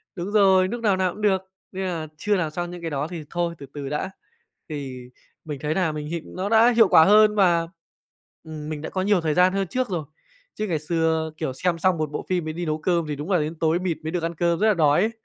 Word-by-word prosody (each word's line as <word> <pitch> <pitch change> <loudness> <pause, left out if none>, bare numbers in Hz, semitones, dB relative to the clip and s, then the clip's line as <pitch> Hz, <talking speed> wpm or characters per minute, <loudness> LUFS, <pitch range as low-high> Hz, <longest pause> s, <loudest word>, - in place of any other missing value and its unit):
đúng 185 +2 -4
rồi, 190 -3 +5
núc 235 +3 -5
nào 205 -4 +2
nào 185 -1 +1
cũng 210 - -11
được, 190 -3 +2 0.3
nên 190 0 -4
nà 165 -3 -3
chưa 210 +5 +1
làm 165 -4 -1
xong 175 +2 -4
những 175 -1 -8
cái 165 - -3
đó 145 +1 -2
thì 165 -2 -7
thôi 170 -1 -2
từ 140 - -9
từ 140 -2 -5
đã. 150 +6 -3 0.6
Thì 130 -4 -6 0.4
mình 145 -3 -5
thấy 150 +1 0
nà 180 -5 +1
mình 150 -1 -5
hiệu 170 +1 -3
nó 190 +2 -4
đã 230 +2 +6
hiệu 225 -4 +7
quả 160 - +7
hơn 210 +1 +6
và, 170 -4 +3 0.8
ừm, 155 -2 -7
mình 150 -1 -5
đã - - -5
có 185 - -2
nhiều 200 -1 +2
thời 155 -2 0
gian 180 +3 +4
hơn 195 -2 -1
trước 255 +5 -2
rồi. 170 -5 -2 0.5
Chứ 215 - -3
ngày 165 -4 -1
xưa, 160 0 0
kiểu, 145 -5 -3
xem 170 +4 -1
xong 185 0 +2
một 155 -2 -2
bộ 150 - -5
phim 180 -2 0
mới 155 - -4
đi 175 +2 -4
nấu 155 -1 -1
cơm 170 0 0
thì 150 - -3
đúng 150 +7 -5
là 180 - +4
đến 155 +2 -3
tối 165 +1 +2
mịt 180 -3 -2
mới 160 - -3
được 175 -1 -2
ăn 170 0 -2
cơm 170 +1 +1
rất 220 - +3
là 215 - +5
đói 150 -1 +4
ấy. 220 +3 +1
170 Hz, 270 wpm, -24 LUFS, 155-190 Hz, 0.8 s, hiệu